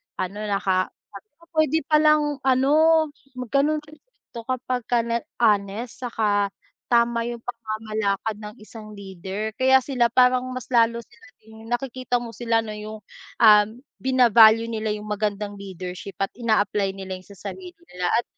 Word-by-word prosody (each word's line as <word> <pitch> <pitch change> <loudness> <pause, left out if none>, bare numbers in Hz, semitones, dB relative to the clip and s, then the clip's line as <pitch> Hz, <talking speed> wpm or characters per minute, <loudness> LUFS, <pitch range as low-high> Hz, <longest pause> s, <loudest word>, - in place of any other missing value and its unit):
Ano, 195 +3 -4
naka 190 -2 +1 0.2
sabi 205 +1 -12
ko - - -22
puwede 315 0 +2
palang 305 -2 +3
ano, 265 +1 +3 0.6
mag 250 -2 -7
ganon 300 +2 +2
rin 305 0 -16 0.3
'to 230 -1 -8
kapagka 245 -2 -1
na 235 0 -1 0.2
honest, 215 +2 0
saka 210 -4 +1 0.4
tama 235 -1 +2
yung 240 -1 -6
pamamalakad 215 -2 -3
ng 210 +1 -9
isang 215 -1 -11
leader. 195 +2 -6
Kaya 260 0 +5
sila 250 -4 +1
parang 250 +1 +3
mas 255 - -7
lalo 235 0 +3
sila 240 +1 -21 0.2
ring, 220 0 -14
nakikita 245 0 -2
mo 230 - -7
sila 230 -1 0
na 215 - -6
yung, 215 0 -8 0.4
ah 210 -2 +7 0.3
bina-value 230 -3 +5
nila 215 -1 -2
yung 210 0 -8
magandang 205 -1 -2
leadership 185 -1 -8
at 195 - -3
ina-apply 205 -4 +1
nila 190 -1 -6
yon 185 - -19
sa 200 - -13 0.2
sarili 365 -2 -11 0.2
nila 180 0 -2
at 235 - +2
225 Hz, 155 wpm, -23 LUFS, 205-250 Hz, 0.6 s, ah